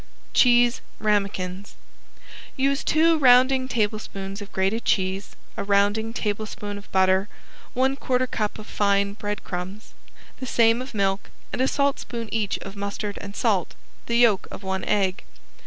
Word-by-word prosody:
~CHEESE 240 Hz, -1 st, +5 dB, 0.2 s
RAMEKINS~ 200 Hz, -2 st, -1 dB, 0.8 s
Use 275 Hz, +1 st, +1 dB
two 320 Hz, +1 st, +3 dB
rounding 255 Hz, 0 st, +5 dB
tablespoons 205 Hz, -4 st, -3 dB
of 205 Hz, -, -9 dB
grated 195 Hz, +5 st, 0 dB
cheese, 190 Hz, 0 st, -1 dB, 0.2 s
a -, -, -3 dB
rounding 205 Hz, +2 st, +2 dB
tablespoon 210 Hz, -2 st, -4 dB
of 200 Hz, -, -17 dB
butter, 190 Hz, +1 st, +3 dB, 0.5 s
one 265 Hz, +2 st, +2 dB
quarter 255 Hz, -2 st, 0 dB
cup 215 Hz, -4 st, -3 dB
of 215 Hz, -, -9 dB
fine 200 Hz, -1 st, +1 dB
breadcrumbs, 205 Hz, -1 st, -6 dB, 0.5 s
the 260 Hz, -, -5 dB
same 230 Hz, 0 st, +3 dB
of 255 Hz, -2 st, -8 dB
milk, 195 Hz, -1 st, 0 dB, 0.2 s
and -, -, -1 dB
a 260 Hz, -, +3 dB
saltspoon 260 Hz, -5 st, -1 dB
each 215 Hz, -3 st, 0 dB
of 195 Hz, -, -8 dB
mustard 200 Hz, 0 st, -4 dB
and 200 Hz, 0 st, -8 dB
salt, 200 Hz, -7 st, 0 dB, 0.3 s
the 235 Hz, -, +1 dB
yolk 230 Hz, -5 st, +4 dB
of -, -, -9 dB
one 190 Hz, 0 st, -2 dB
egg. 195 Hz, -3 st, 0 dB
210 Hz, 140 wpm, -24 LUFS, 200-240 Hz, 0.8 s, ~CHEESE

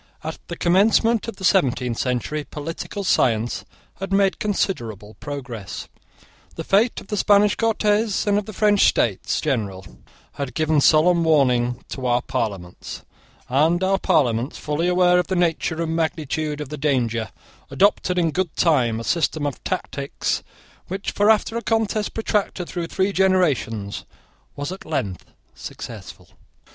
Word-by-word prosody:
At 160 Hz, +1 st, -5 dB
the 170 Hz, -, -5 dB
commencement 215 Hz, +6 st, +3 dB
of 230 Hz, -, -5 dB
the 190 Hz, -, -11 dB
seventeenth 130 Hz, -, +2 dB
century 130 Hz, +4 st, -1 dB
political 165 Hz, +7 st, -6 dB
science 120 Hz, -, +1 dB, 0.3 s
had 195 Hz, +1 st, -5 dB
made 195 Hz, -1 st, +2 dB
considerable 115 Hz, -, -2 dB
progress. 125 Hz, -9 st, -6 dB, 0.7 s
The -, -, -5 dB
fate 215 Hz, +5 st, +2 dB
of -, -, -15 dB
the 210 Hz, -, -2 dB
Spanish 205 Hz, +1 st, +4 dB
Cortes 215 Hz, -1 st, +1 dB
and 205 Hz, 0 st, +3 dB
of 210 Hz, -, -8 dB
the -, -, -5 dB
French 205 Hz, -1 st, +3 dB
States 105 Hz, -6 st, +1 dB
General 105 Hz, -, -2 dB, 0.5 s
had 140 Hz, -2 st, -5 dB
given 155 Hz, -2 st, +2 dB
solemn 165 Hz, +4 st, +5 dB
warning 125 Hz, -6 st, +2 dB
to 130 Hz, -2 st, -4 dB
our 120 Hz, 0 st, +2 dB
Parliaments; 100 Hz, -9 st, -4 dB, 0.4 s
and 160 Hz, +7 st, +2 dB
our 195 Hz, +1 st, +2 dB
Parliaments, 130 Hz, -, +1 dB
fully 150 Hz, +3 st, -1 dB
aware 180 Hz, 0 st, +4 dB
of 180 Hz, -, -1 dB
the 190 Hz, -, -1 dB
nature 165 Hz, -2 st, 0 dB
and 165 Hz, 0 st, -2 dB
magnitude 155 Hz, -2 st, -2 dB
of 145 Hz, -, -6 dB
the 150 Hz, -, -6 dB
danger, 120 Hz, -6 st, 0 dB, 0.4 s
adopted, 190 Hz, -2 st, +2 dB
in 165 Hz, -2 st, +2 dB
good 180 Hz, 0 st, -2 dB
time, 125 Hz, -10 st, +2 dB
a -, -, -5 dB
system 160 Hz, 0 st, 0 dB
of 145 Hz, -, -4 dB
tactics 140 Hz, +1 st, -2 dB, 0.5 s
which, 195 Hz, +2 st, -4 dB
after 215 Hz, +2 st, +3 dB
a -, -, -2 dB
contest 220 Hz, -2 st, -1 dB
protracted 205 Hz, -5 st, -1 dB
through 175 Hz, -2 st, -4 dB
three 190 Hz, +3 st, 0 dB
generations, 150 Hz, -, +1 dB, 0.5 s
was 145 Hz, +4 st, -4 dB
at 195 Hz, +1 st, -7 dB
length 105 Hz, -, -3 dB, 0.3 s
successful. -, -, -9 dB
160 Hz, 145 wpm, -22 LUFS, 130-195 Hz, 0.7 s, solemn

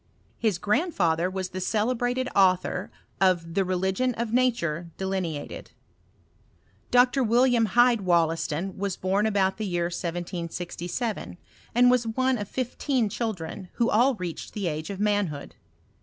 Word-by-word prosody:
His 215 Hz, -6 st, +1 dB
grandfather 185 Hz, -, +1 dB
was 185 Hz, -1 st, -4 dB
the 185 Hz, 0 st, -5 dB
celebrated 245 Hz, +5 st, 0 dB
author 185 Hz, 0 st, +2 dB, 0.3 s
of 175 Hz, -3 st, +2 dB
the 195 Hz, -, +2 dB
Religion 190 Hz, +7 st, 0 dB
of 230 Hz, -1 st, -3 dB
Nature 180 Hz, -10 st, +1 dB
delineated. 185 Hz, -6 st, -4 dB, 1.2 s
Dr. 250 Hz, +2 st, +4 dB
William 240 Hz, 0 st, +3 dB
Hyde 240 Hz, +3 st, +4 dB
WoUaston 170 Hz, 0 st, 0 dB
was 195 Hz, -1 st, -2 dB
bom 195 Hz, +3 st, +1 dB
about 195 Hz, -3 st, +1 dB
the 215 Hz, -1 st, -3 dB
year 175 Hz, -1 st, -1 dB
1767, 175 Hz, -, -4 dB, 0.4 s
and 245 Hz, +1 st, +6 dB
was 245 Hz, -2 st, +2 dB
one 255 Hz, +2 st, +1 dB
of 205 Hz, -, -4 dB
fifteen 255 Hz, -2 st, -1 dB
children, 190 Hz, -5 st, -4 dB
who 235 Hz, 0 st, +1 dB
aU 245 Hz, +5 st, +4 dB
reached 180 Hz, -5 st, -6 dB
the 205 Hz, -2 st, -2 dB
age 155 Hz, -1 st, -3 dB
of 195 Hz, -1 st, -5 dB
manhood. 205 Hz, -8 st, -1 dB
195 Hz, 130 wpm, -26 LUFS, 175-235 Hz, 1.2 s, and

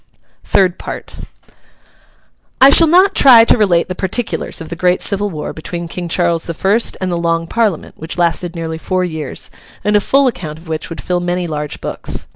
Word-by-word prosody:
THIRD 185 Hz, -3 st, +2 dB
PART -, -, -8 dB, 1.4 s
I 270 Hz, +1 st, +8 dB
shall 330 Hz, +3 st, +7 dB
not 370 Hz, +5 st, +5 dB
try 245 Hz, -8 st, +7 dB
to -, -, +4 dB
relate 185 Hz, -6 st, +2 dB
the 185 Hz, -, -4 dB
particulars 190 Hz, +5 st, -3 dB
of 165 Hz, -, -8 dB
the 170 Hz, -, -5 dB
great 180 Hz, +1 st, +1 dB
civil 205 Hz, 0 st, +1 dB
war 155 Hz, -5 st, -6 dB
between 170 Hz, +2 st, -6 dB
King 175 Hz, +1 st, -6 dB
Charles 170 Hz, -1 st, 0 dB
the 170 Hz, -, -5 dB
First 205 Hz, +7 st, +1 dB
and 185 Hz, -1 st, -2 dB
the 175 Hz, -, -1 dB
Long 165 Hz, 0 st, 0 dB
Parliament, 210 Hz, -3 st, -2 dB
which 160 Hz, +2 st, -5 dB
lasted 175 Hz, 0 st, 0 dB
nearly 160 Hz, -1 st, -5 dB
four 185 Hz, +2 st, -1 dB
years, 160 Hz, -6 st, -5 dB, 0.3 s
and 210 Hz, 0 st, +1 dB
a 205 Hz, -, +4 dB
full 275 Hz, +6 st, +2 dB
account 175 Hz, -11 st, -3 dB
of 165 Hz, +1 st, -16 dB
which 160 Hz, -1 st, -4 dB
would 165 Hz, -, -7 dB
fill 180 Hz, -1 st, -1 dB
many 175 Hz, 0 st, -2 dB
large 150 Hz, -2 st, -5 dB
books. -, -, -4 dB
175 Hz, 195 wpm, -15 LUFS, 165-205 Hz, 1.4 s, I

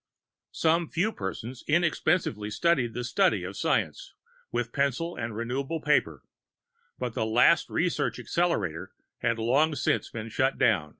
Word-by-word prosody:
Some 165 Hz, 0 st, +2 dB
few 205 Hz, +7 st, 0 dB
persons 115 Hz, -, -6 dB
inexpensively 155 Hz, -, +1 dB
studied 125 Hz, -1 st, +1 dB
the 125 Hz, -, -3 dB
study 110 Hz, -5 st, +2 dB
of 95 Hz, +2 st, -6 dB
science -, -, -1 dB, 0.4 s
with 120 Hz, -1 st, -2 dB
pencil 140 Hz, +5 st, 0 dB
and 115 Hz, -2 st, -4 dB
renewable 135 Hz, +7 st, -2 dB
paper, 150 Hz, 0 st, +1 dB, 0.7 s
but 125 Hz, -2 st, -3 dB
the -, -, -1 dB
last 120 Hz, +9 st, +4 dB
research 175 Hz, 0 st, 0 dB
accelerator 95 Hz, -, -1 dB, 0.3 s
had 115 Hz, -1 st, 0 dB
long 140 Hz, +8 st, +2 dB
since -, -, 0 dB
been 110 Hz, -1 st, -6 dB
shut 130 Hz, +4 st, 0 dB
down. 100 Hz, -12 st, +2 dB
125 Hz, 135 wpm, -27 LUFS, 110-160 Hz, 0.7 s, last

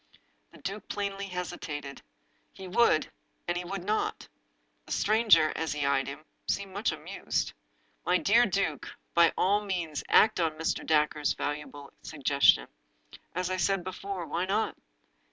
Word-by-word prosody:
The -, -, -15 dB
duke 200 Hz, +2 st, -6 dB
plainly 200 Hz, -1 st, -3 dB
hesitated. 150 Hz, -6 st, -5 dB, 0.5 s
He 190 Hz, -, -10 dB
would 180 Hz, -4 st, +3 dB, 0.2 s
— -, -, -44 dB
and 175 Hz, -, 0 dB
he 175 Hz, -, -2 dB
would 185 Hz, +1 st, -5 dB
not. 210 Hz, +3 st, -1 dB, 0.6 s
The -, -, -3 dB
stranger, 210 Hz, -8 st, +4 dB
as 160 Hz, -2 st, -2 dB
he 145 Hz, -1 st, -1 dB
eyed 135 Hz, -1 st, +1 dB
him, 140 Hz, +3 st, -8 dB, 0.2 s
seemed 195 Hz, -1 st, -2 dB
much 205 Hz, +4 st, 0 dB
amused. -, -, -3 dB, 0.3 s
" -, -, -40 dB
My 180 Hz, -, +4 dB
dear 230 Hz, +6 st, +4 dB
duke, 185 Hz, -6 st, -1 dB, 0.3 s
by 170 Hz, -1 st, +6 dB
all 205 Hz, +3 st, +3 dB
means 175 Hz, -7 st, -3 dB
act 215 Hz, -2 st, +5 dB
on 165 Hz, -2 st, +1 dB
Mr. 160 Hz, -, -1 dB
Dacre's 150 Hz, -1 st, +2 dB
valuable 145 Hz, -1 st, -5 dB
suggestion. 140 Hz, -2 st, +3 dB, 0.7 s
As 180 Hz, 0 st, -1 dB
I 185 Hz, -, 0 dB
said 185 Hz, +1 st, +1 dB
before, 185 Hz, 0 st, -5 dB
why 170 Hz, +3 st, -1 dB
not? 205 Hz, +4 st, 0 dB
180 Hz, 155 wpm, -29 LUFS, 155-200 Hz, 0.7 s, by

